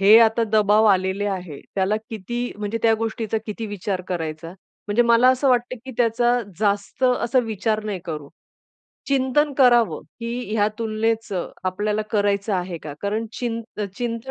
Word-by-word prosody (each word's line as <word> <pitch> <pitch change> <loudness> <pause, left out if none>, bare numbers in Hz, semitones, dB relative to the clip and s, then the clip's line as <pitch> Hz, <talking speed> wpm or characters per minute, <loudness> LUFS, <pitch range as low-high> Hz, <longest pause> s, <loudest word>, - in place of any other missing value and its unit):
हे 205 +3 +8
आता 225 +1 +4
दबाव 215 0 +4
आलेले 190 +2 0
आहे. 180 -7 -4
त्याला 195 +2 +1
किती 240 +4 -4
म्हणजे 210 +2 -3
त्या 225 -1 +5
गोष्टीचा 225 0 -2
किती 220 +1 -4
विचार 200 -2 -3
करायचा? 165 -2 -4 0.4
म्हणजे 210 +4 +3
मला 235 +2 +5
असं 260 +1 +3
वाटतं, 245 0 +1
की 265 - -7
त्याचा 240 +1 +2 0.2
जास्त 205 +3 -1
असा 250 0 +2
विचार 215 0 -1
नाही 205 -3 -3
करू. 150 -4 -5 0.8
चिंतन 275 +2 +2
करावं 240 -3 +4 0.2
की 235 -2 -4
या 205 -1 +3
तुलनेचं 220 -3 -1 0.2
आपल्याला 210 +3 0
करायचं 205 -1 +1
आहे 180 -1 -2
का? 150 -2 -6
कारण 215 +3 -1
चि 240 +1 -3 0.5
चिंतन 240 +1 -3
220 Hz, 150 wpm, -23 LUFS, 200-235 Hz, 0.8 s, हे